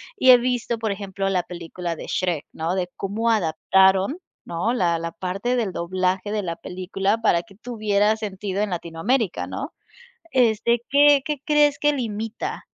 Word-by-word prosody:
y 260 -10 +3
he 250 - +9
visto, 240 -1 -1
por 220 -2 -2
ejemplo, 195 -1 -3
la 180 -2 +1
película 175 0 -6
de - - -8
Shrek, 175 -5 -1
¿no? 165 +3 -2
De 180 -2 -1
cómo 220 +4 -1
adaptaron, 190 - +3 0.3
¿no? 180 +8 -1
La 175 -7 +1
la 165 0 -4
parte 190 +8 -2
del 215 -7 -1
doblaje 185 +3 -1
de 210 -1 0
la 170 -2 -3
película 195 +4 -2
para 170 -6 +2
que 200 -4 -19
tuviera 215 -2 +1
sentido 200 -2 -4
en 210 - 0
Latinoamérica, 175 +6 -1
¿no? - - -5 0.6
Este, 235 -1 +3
¿Qué 285 0 +6
qué 300 -1 -2
crees 295 -1 +4
que 295 0 +3
limita, 225 -3 -4
200 Hz, 165 wpm, -23 LUFS, 180-235 Hz, 0.6 s, he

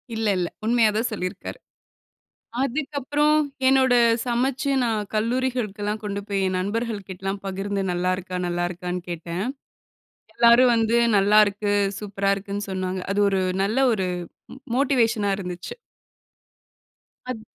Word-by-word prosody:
இல்ல, 220 -1 -1
இல்ல. 175 -1 0 0.2
உண்மையாதான் 225 0 +2
சொல்லியிருக்காரு. 190 - -5 1.1
அதுக்கப்புறம் 290 +2 0 0.3
என்னோட 260 -1 +4 0.3
சமச்சு 255 +3 0
நான் 215 -3 -1
கல்லூரிகளுக்குலாம் 220 -3 -1
கொண்டு 200 -1 -3
போய், 200 -1 -1
என் 185 0 -1
நண்பர்கள் 210 +1 -3
கிட்டலாம் 195 +2 -4
பகிர்ந்து 195 +1 -2
நல்லா 180 +1 0
இருக்கா? 180 -1 -5
நல்லா 175 0 -1
இருக்கான்னு 180 0 -4
கேட்டேன். 170 +2 -4 0.9
எல்லாரும் 240 +1 +6
வந்து 225 +1 +2 0.2
நல்லாருக்கு, 205 0 +3 0.3
சூப்பரா 200 -1 -1
இருக்குன்னு 200 +1 -5
சொன்னாங்க. 185 0 -3
அது 205 +1 +1
ஒரு 190 -1 +1 0.2
நல்ல 220 +7 0
ஒரு 190 -3 -1 0.5
மோ - - -10 0.2
மோட்டிவேஷனா 230 -6 +2
இருந்துச்சு. 180 -2 -6 1.6
அது 225 -4 -4
205 Hz, 115 wpm, -24 LUFS, 190-235 Hz, 1.6 s, எல்லாரும்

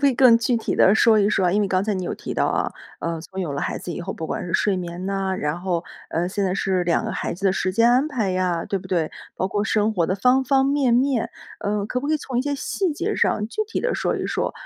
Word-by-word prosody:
可 280 - +5
以 260 - +1
更 250 -3 +7
具 240 0 +1
体 225 - -2
地 195 - +5
说 220 -1 +5
一 200 - +3
说 190 -3 +2
啊？ 175 - +2
因 210 - +2
为 200 - 0
刚 185 +1 +1
才 215 - 0
你 185 -2 -3
有 - - -3
提 - - -6
到 - - +2
啊， - - 0 0.3
呃， 165 -1 -3
从 190 +3 -7
有 165 -6 -2
了 140 - -3
孩 - - -2
子 175 - -6
以 - - -5
后， 190 +2 -4
不 160 - -6
管 - - -3
是 170 - -5
睡 200 -2 +2
眠 175 +1 -5
呐， 195 -1 -1
然 150 +4 -2
后， 180 -2 -1 0.3
呃， 175 +2 0
现 200 +1 -1
在 185 - 0
是 190 -2 0
2 170 - +1
个 - - -3
孩 - - -3
子 185 - -8
的 190 - +4
时 185 0 -1
间 230 +4 +4
安 265 +5 +3
排 230 -10 -1
呀， 180 -2 0
对 200 -2 -2
不 - - -12
对？ 170 -4 0 0.3
包 185 - 0
括 205 +2 -1
生 215 0 +1
活 175 -4 +2
的 185 - 0
方 250 +6 +3
方 270 0 +3
面 275 -3 +2
面， 255 -1 +2 0.3
呃， 205 0 -1
可 250 +3 -2
不 285 - -4
可 310 - +3
以 - - +3
从 260 -4 -4
一 - - +1
些 285 0 -1
细 350 +4 -1
节 - - -2
上 210 0 +1
具 430 - -2
体 445 - -3
地 - - 0
说 - - 0
一 - - -3
说？ - - -1
200 Hz, 315 characters per minute, -23 LUFS, 185-250 Hz, 0.3 s, 更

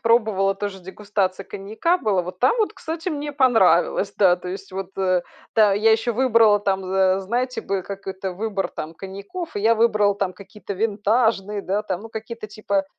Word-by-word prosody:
пробовала, 220 -4 +2
тоже 200 -1 -5
дегустация 195 0 -2
коньяка 215 - -1
была. 205 - +1
Вот 180 +1 -8
там 460 - +3
вот, 430 -1 +1
кстати, 325 -3 -5
мне 295 -3 -4
понравилось, 225 - +3
да, 185 -3 +5
то 180 - -11
есть 195 +2 -7
вот, 190 0 -6
э. 185 -2 +2 0.3
Да, 215 -2 +6
я 215 +3 +3
еще 225 +2 +1
выбрала 225 -4 +4
там, 195 -1 -1
за 190 0 +2
знаете, 245 +6 -2
бы, 195 -1 -2
как 195 +1 -8
это 190 0 -4
выбор 200 0 -2
там 160 +2 -7
коньяков, 200 - -7
и - - -1
я 225 +3 +4
выбрала 215 -3 +3
там 195 -2 -2
какие-то 200 +2 -9
винтажные, 210 0 +1
да, 200 +3 -1
там, 190 -2 -4
ну 225 - -9
какие-то 220 0 -7
типа 200 -2 -1
205 Hz, 185 wpm, -22 LUFS, 190-225 Hz, 0.3 s, Да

